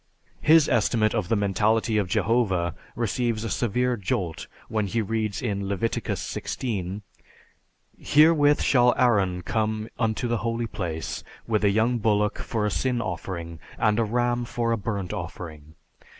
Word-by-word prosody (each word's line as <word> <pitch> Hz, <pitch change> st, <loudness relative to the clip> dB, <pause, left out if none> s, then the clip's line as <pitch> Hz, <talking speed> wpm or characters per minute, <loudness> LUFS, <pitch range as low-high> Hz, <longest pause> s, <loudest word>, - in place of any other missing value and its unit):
His 160 Hz, -1 st, +6 dB
estimate 110 Hz, -3 st, +2 dB
of 105 Hz, -6 st, -1 dB
the 115 Hz, -, +3 dB
mentality 105 Hz, +2 st, +1 dB
of 100 Hz, -, -1 dB
Jehovah 95 Hz, -4 st, +1 dB, 0.2 s
receives 115 Hz, 0 st, -1 dB
a 115 Hz, -, -3 dB
severe 125 Hz, +4 st, +1 dB
jolt 95 Hz, -, -3 dB, 0.2 s
when 110 Hz, -2 st, -1 dB
he 115 Hz, +4 st, -1 dB
reads 110 Hz, -1 st, -2 dB
in 100 Hz, -4 st, -2 dB
Leviticus 100 Hz, +3 st, -2 dB
XVI, 100 Hz, -4 st, -4 dB, 1.0 s
"Herewith 150 Hz, -1 st, +4 dB
shall 125 Hz, -2 st, +4 dB
Aaron 95 Hz, -7 st, +2 dB
come 110 Hz, +1 st, -1 dB
unto 115 Hz, +1 st, 0 dB
the 120 Hz, 0 st, 0 dB
holy 115 Hz, +1 st, -2 dB
place 85 Hz, -7 st, -4 dB, 0.2 s
with 110 Hz, -2 st, 0 dB
a 100 Hz, -, +5 dB
young 115 Hz, +4 st, +2 dB
bullock 105 Hz, -1 st, +1 dB
for 110 Hz, -3 st, -2 dB
a 105 Hz, -, 0 dB
sin 125 Hz, +1 st, 0 dB
offering 85 Hz, -4 st, -5 dB, 0.2 s
and 105 Hz, 0 st, +2 dB
a -, -, +3 dB
ram 120 Hz, +2 st, 0 dB
for 115 Hz, 0 st, -1 dB
a -, -, +3 dB
burnt 100 Hz, -3 st, -3 dB
offering. 80 Hz, -2 st, -7 dB
110 Hz, 150 wpm, -25 LUFS, 100-120 Hz, 1.0 s, His